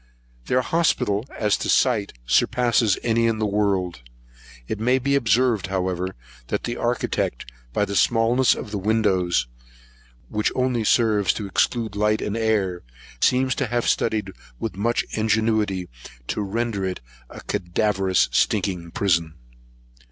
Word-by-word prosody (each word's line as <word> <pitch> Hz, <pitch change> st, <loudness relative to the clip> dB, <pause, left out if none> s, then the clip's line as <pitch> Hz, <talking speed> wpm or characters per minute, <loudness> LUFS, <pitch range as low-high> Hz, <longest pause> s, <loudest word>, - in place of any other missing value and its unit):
Their 130 Hz, -, +2 dB
hospital, 120 Hz, -11 st, +1 dB
as 105 Hz, -2 st, +1 dB
to -, -, -4 dB
scite, 120 Hz, -7 st, +2 dB
surpasses 115 Hz, -, +2 dB
any 115 Hz, 0 st, +2 dB
in 115 Hz, -1 st, 0 dB
the 110 Hz, -, 0 dB
world. 100 Hz, -6 st, 0 dB, 0.7 s
It 110 Hz, -, -3 dB
may 125 Hz, +4 st, +3 dB
be 140 Hz, +2 st, 0 dB
observed, 120 Hz, -6 st, +2 dB
however, 95 Hz, -1 st, -2 dB, 0.3 s
that -, -, -2 dB
the -, -, -3 dB
architect, -, -, -2 dB, 0.2 s
by 105 Hz, -, +1 dB
the 100 Hz, -, -5 dB
smallness 120 Hz, +4 st, +3 dB
of 105 Hz, -, -7 dB
the 105 Hz, -, -2 dB
windows, 95 Hz, -, +1 dB, 0.8 s
which 105 Hz, -, -1 dB
only 125 Hz, -3 st, 0 dB
serve 105 Hz, -4 st, +2 dB
to 105 Hz, -, -5 dB
exclude 110 Hz, +3 st, 0 dB
the 100 Hz, -, -7 dB
light 105 Hz, 0 st, +2 dB
and 105 Hz, -, -3 dB
air, 105 Hz, -6 st, 0 dB, 0.4 s
seems 130 Hz, 0 st, +3 dB
to 130 Hz, -, +1 dB
have 120 Hz, +1 st, -1 dB
studied, 105 Hz, -3 st, 0 dB, 0.3 s
with 110 Hz, -4 st, -4 dB
much 115 Hz, +5 st, 0 dB
ingenuity, 110 Hz, -4 st, 0 dB, 0.4 s
to -, -, -1 dB
render 105 Hz, 0 st, -2 dB
it 95 Hz, -1 st, -3 dB, 0.3 s
a -, -, -10 dB
cadaverous 95 Hz, 0 st, +1 dB
stinking 90 Hz, -3 st, 0 dB
prison. 85 Hz, -4 st, 0 dB
105 Hz, 140 wpm, -23 LUFS, 95-115 Hz, 0.8 s, may